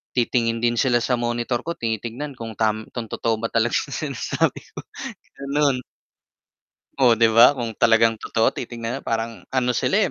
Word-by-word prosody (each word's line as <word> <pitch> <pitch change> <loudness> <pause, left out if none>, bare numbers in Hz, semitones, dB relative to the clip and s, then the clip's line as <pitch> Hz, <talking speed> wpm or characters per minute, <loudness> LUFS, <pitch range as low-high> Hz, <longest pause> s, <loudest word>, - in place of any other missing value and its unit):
titingin 115 -2 0
din 120 -1 +2
sila 125 -3 +3
sa 125 - 0
monitor 120 0 -1
ko 170 +5 -4
tinitingnan 115 +5 -4
kung 115 -1 -6
tam 110 0 0
kung 120 -2 -3
totoo 115 -1 0
ba 115 +1 -4
talaga 115 +1 +1
yung 140 - -1 0.2
sinasabi - - -1
ko, - - -7 0.6
ganun. 140 -2 +1 1.2
Oh, 125 -4 +5
'di 115 0 +4
ba 115 +5 +7
kung 120 -4 -3
talagang 115 -1 +4
totoo 110 +1 +1
titingnan 120 +1 -5
na - - -14
parang 115 0 -3
ano 125 -1 +2
sila, 125 - +1
115 Hz, 165 wpm, -22 LUFS, 115-125 Hz, 1.2 s, ba